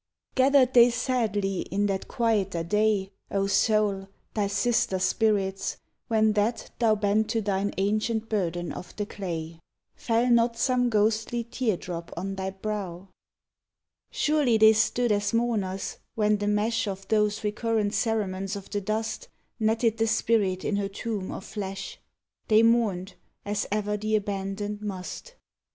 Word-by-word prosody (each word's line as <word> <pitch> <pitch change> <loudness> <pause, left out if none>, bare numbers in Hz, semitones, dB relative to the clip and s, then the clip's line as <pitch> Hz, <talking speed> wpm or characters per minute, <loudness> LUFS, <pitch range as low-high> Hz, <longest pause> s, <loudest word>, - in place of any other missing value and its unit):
Gathered 260 -1 +4
they 240 0 +8
sadly 220 -6 -1
in 205 +1 -1
that 195 -2 -2
quieter 200 -7 0
day, 210 +1 +1 0.2
O 195 0 0
soul! 200 -1 +2 0.3
thy 205 -2 0
sister 225 0 +1
spirits, 195 0 0 0.3
when 220 -1 +3
that 215 +3 -1
thou 225 -3 +4
Bent 210 +1 +1
to 225 0 +1
thine 200 -1 -1
ancient 215 +3 0
burden 175 -5 -1
of - - -9
the 205 - -2
clay? 165 -5 -5 0.4
Fell 240 -3 +1
not 235 0 +3
some 245 0 +2
ghostly 220 +2 +1
tear 230 -3 -1
drop 170 -1 -7
on 195 +1 -3
thy 190 0 -3
brow? 195 -2 -5 1.0
Surely 295 -7 +2
they 220 0 +7
stood 230 +2 +1
as 205 +2 +1
mourners, 210 -5 -1 0.2
when 210 -1 +2
the 205 - -1
mesh 220 +2 +1
Of 195 -1 -5
those 210 0 +1
recurrent 210 0 0
cerements 200 -3 -1
of 200 -1 -9
the 205 0 -1
dust 220 - -3 0.3
Netted 225 +1 +1
the 225 - +2
spirit 215 -4 +1
in 205 - 0
her 200 -1 -1
tomb 205 -1 -4
of 195 - -7
flesh. 195 -2 -6 0.5
They 220 +1 +5
mourned, 215 -5 +2 0.3
as 205 0 -1
ever 210 0 0
the 215 +1 0
abandoned 205 0 -3
must. 205 - -6
210 Hz, 145 wpm, -27 LUFS, 195-225 Hz, 1.0 s, they